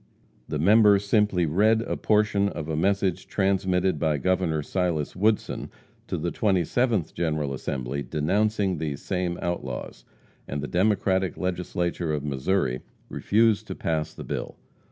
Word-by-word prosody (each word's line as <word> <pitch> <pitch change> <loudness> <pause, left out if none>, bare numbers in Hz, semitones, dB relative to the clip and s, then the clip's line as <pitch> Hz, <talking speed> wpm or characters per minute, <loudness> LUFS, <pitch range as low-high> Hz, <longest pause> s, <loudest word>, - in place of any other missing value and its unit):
The 75 - -2
member 105 +5 +6
simply 100 -3 +2
read 110 +8 +3
a - - -3
portion 105 -2 +2
of 75 -5 -6
a 80 - -2
message 95 +2 0
transmitted 95 -3 +1
by 75 -1 +1
Governor 85 -2 0
Silas 85 -4 -1
Woodson 105 +3 0 0.4
to - - -2
the - - -2
27th 100 0 +1
General 75 -4 -1
Assembly 65 +1 -3
denouncing 95 +5 0
these 75 -3 -3
same 90 -2 -2
outlaws; 65 -8 -4 0.4
and 70 - -3
the 70 - -4
Democratic 95 -1 +1
Legislature 90 -2 -2
of 75 - -4
Missouri 65 -1 0 0.3
refused 110 0 +2
to - - -5
pass 80 -1 -2
the - - -7
bill. - - -5
90 Hz, 135 wpm, -26 LUFS, 75-100 Hz, 0.4 s, member